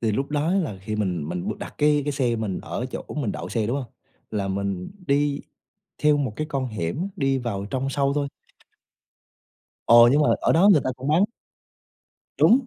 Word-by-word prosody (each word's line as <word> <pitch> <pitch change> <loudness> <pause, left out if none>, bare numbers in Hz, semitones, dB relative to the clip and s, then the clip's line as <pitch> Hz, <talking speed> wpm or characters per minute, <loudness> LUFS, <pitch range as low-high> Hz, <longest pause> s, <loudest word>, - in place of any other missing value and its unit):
Thì 110 -2 +1
lúc 135 +6 -2
đó 150 +3 +1
là 160 - -1
khi 105 +2 -3
mình 90 -7 -1
mình 90 0 -3
đặt - - -7
cái 150 0 +4
cái 145 - -1
xe 125 -4 0
mình 110 -4 -2
ở 125 - -4
chỗ - - -5
mình 135 -9 -1
đậu - - -6
xe, 110 -3 -1
đúng 120 +5 0
hông? 135 - -4 0.4
Là 100 -2 -2
mình 95 -1 -3 0.2
đi 140 0 +1 0.6
theo 150 -1 +5
một 135 -7 -1
cái 155 - -2
con 135 -2 -1
hẻm, 115 - -3
đi 135 -1 +1
vào 110 -6 -3
trong 135 +1 -1
sâu 140 0 +1
thôi. 145 -1 0 1.6
Ồ! 120 +1 +8
Nhưng 150 - +4
mà - - +3
ở - - +3
đó 185 +5 +5
người 175 -8 +6
ta 130 - 0
cũng 130 - -5
bán 165 +6 +4 1.2
Đúng, 250 +2 +5
135 Hz, 200 wpm, -24 LUFS, 105-145 Hz, 1.6 s, Ồ